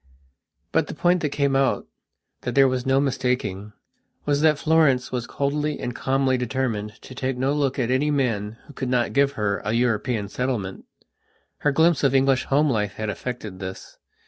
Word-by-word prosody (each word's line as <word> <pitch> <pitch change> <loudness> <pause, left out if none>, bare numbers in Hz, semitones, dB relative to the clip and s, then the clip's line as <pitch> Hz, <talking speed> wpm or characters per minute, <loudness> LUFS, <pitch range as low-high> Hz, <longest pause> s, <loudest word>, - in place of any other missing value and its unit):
But - - +2
the - - -6
point 175 0 +2
that 150 - 0
came 140 -1 0
outthat 135 -2 -3
there 135 -1 +6
was 130 0 -2
no 135 0 +4
mistakingwas 125 +1 -3
that 155 -2 +4
Florence 150 -6 +3
was 120 -2 -3
coldly 145 +2 -1
and 120 -1 -4
calmly 135 0 +1
determined 115 -4 -2
to - - -10
take 130 0 -2
no 135 +3 +1
look 140 -3 0
at 125 -2 0
any 135 +4 +2
man 115 -7 -1
who 145 - -14
could 130 -1 -4
not 125 -1 +1
give 140 0 +3
her 105 -4 -1
a 105 - -1
European 115 -2 0
settlement. 110 -4 -3 0.7
Her 145 - +2
glimpse 160 +2 +3
of 135 -1 +3
English 135 -1 +3
home 145 +3 +3
life 105 -4 -1
had 110 -1 -3
effected 110 -4 -6
this. 95 -1 -8
130 Hz, 170 wpm, -24 LUFS, 115-140 Hz, 0.7 s, there